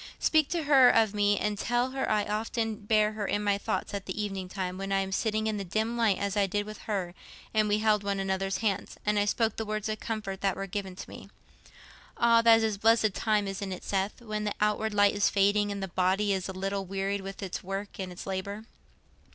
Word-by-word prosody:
Speak 310 -3 +3
to 340 -3 -1
her 270 -4 +7
of 220 -2 +3
me, 205 0 +2
and 210 -1 -1
tell 240 +3 0
her 265 0 -2
I 210 -1 +2
often 225 +1 -2
bear 215 0 +2
her 215 -2 -4
in 205 - 0
my 200 -1 +1
thoughts - - -3
at 200 -1 -5
evening 195 -3 -3
time, 185 -1 -4
when 195 0 -4
I 195 0 +2
am 195 0 -4
sitting 215 +2 0
in 215 -1 -1
the 200 - -3
dim 220 +5 -1
light 225 -5 +2
as 200 0 -2
I 200 -1 +2
did 205 +2 -1
with 215 0 -8
her, 185 -4 -2 0.4
and 215 -1 +2
we 205 - +3
held 215 -1 +2
one 200 -1 -1
another's 195 0 -1
hands, 200 -2 -1
and 210 0 +2
I 205 - +2
spoke 220 +1 0
the 225 - -1
words 215 -1 -3
of 215 - -3
comfort 200 -4 -4
that 195 -2 +1
were 195 - -4
given 195 -1 -5
to 190 - -8
me. - - -11 0.9
Ah, 230 -1 +5
that 225 -1 +6
is 215 -2 0
a - - -21
blessed 225 -1 +4
time, 210 -1 +1
isn't 195 0 -4
it, 185 - -6
Seth, 200 +5 -2
when 215 -2 -3
the 210 - -2
outward 210 0 0
light 205 0 +5
is 205 -1 +2
fading, 205 +1 +2
and 200 -1 -4
the - - -2
body 190 +3 +1
is 190 0 -2
a - - -2
little 195 +1 -3
wearied 195 +1 -2
with 195 +1 -7
its 185 - -5
work 195 +2 -5
and 185 -1 -4
its 180 - -8
labour. 200 +2 -4
205 Hz, 240 wpm, -29 LUFS, 195-215 Hz, 0.9 s, her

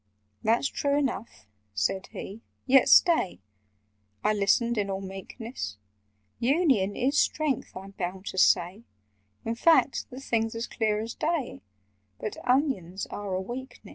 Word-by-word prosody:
"That's 230 +5 +2
true 285 0 0
enough," 235 - -3 0.3
said 105 - 0
he, 210 +4 -8 0.2
"yet 270 0 +5
stay—" 335 - +5 0.8
I 215 - +3
listened 215 +3 +2
in 200 -1 -1
all 190 0 -2
meekness— 195 - -7 0.6
"Union 250 - +2
is 275 +4 +2
strength, 300 -10 0
I'm 195 +1 -9
bound 185 0 -5
to 190 - -1
say; 180 +3 +3 0.6
In 225 - -1
fact, 265 +1 +3
the 255 - -8
thing's 225 -4 -1
as 230 +1 -2
clear 215 -3 -1
as 225 +2 -5
day; 310 - -2 0.6
But 215 - -5
onions 250 - 0
are 200 -2 -4
a - - 0
weakness." 250 +7 -8
225 Hz, 140 wpm, -27 LUFS, 195-265 Hz, 0.8 s, yet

